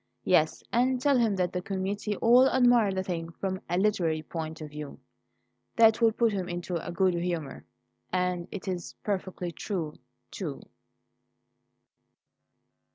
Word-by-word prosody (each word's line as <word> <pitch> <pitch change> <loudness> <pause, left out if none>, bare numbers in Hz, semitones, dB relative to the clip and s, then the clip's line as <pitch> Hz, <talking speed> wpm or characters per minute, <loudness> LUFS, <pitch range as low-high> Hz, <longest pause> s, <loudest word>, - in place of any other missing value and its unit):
Yes, - - +2
and 250 +2 +2
tell 280 +2 +3
him 225 -4 +2
that 180 -2 -1
the 180 - -1
committee 200 +2 -2
all 245 +5 +6
admired 245 -6 +4
the 190 - -1
thing 165 -3 -4
from 190 +1 -3
a 175 - +1
literary 175 -6 +1
point 160 0 -5
of 155 -2 -8
view. 150 -1 -7 0.8
That 225 0 +5
will 225 -1 +6
put 230 0 +2
him 185 -2 -3
into 175 0 -4
a - - -5
good 185 +1 +2
humour, 170 -5 -3 0.5
and 180 -1 0
it's 185 -3 -5
perfectly 185 -3 -3
true, 165 -4 -4 0.4
too." - - -5
185 Hz, 140 wpm, -28 LUFS, 175-215 Hz, 0.8 s, all